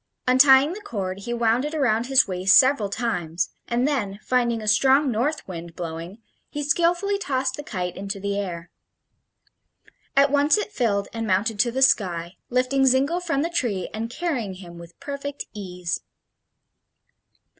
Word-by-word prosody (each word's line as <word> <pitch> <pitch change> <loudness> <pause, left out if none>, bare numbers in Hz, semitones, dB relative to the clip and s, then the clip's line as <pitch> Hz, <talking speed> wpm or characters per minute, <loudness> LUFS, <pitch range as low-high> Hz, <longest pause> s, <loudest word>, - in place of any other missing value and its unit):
Untying 265 +4 +6
the 420 - -8
cord, 195 - -4
he 220 +4 -6
wound 235 +1 +1
it 300 +2 -4
around 245 -5 +1
his 265 -3 +5
waist 185 +1 +4
several 260 -6 +4
times, 180 -7 -2 0.2
and 245 +3 +1
then, 210 -9 -2
finding 240 -2 +1
a 215 - -7
strong 265 +6 +4
north 260 +8 -1
wind 170 -2 -8
blowing, 170 +3 -6 0.3
he 295 - -4
skilfully 345 +6 +1
tossed 265 -7 -1
the - - -6
kite 180 - -4
into 195 +1 -5
the 200 +1 -2
air. 175 -3 -6 1.5
At 280 0 +5
once 290 +5 +4
it 420 0 -3
filled 205 - 0
and 225 -1 -3
mounted 205 +3 0
to 240 +2 +3
the 265 +2 +1
sky, 180 -8 +1
lifting 255 +2 +2
Zingle 275 +7 +2
from 330 -5 -1
the 335 - -1
tree 215 - -1
and 225 +1 -4
carrying 245 - -3
him 175 -2 -11
with 170 0 -14
perfect 285 0 -6
ease. 180 -4 -4
235 Hz, 160 wpm, -23 LUFS, 195-280 Hz, 1.5 s, Untying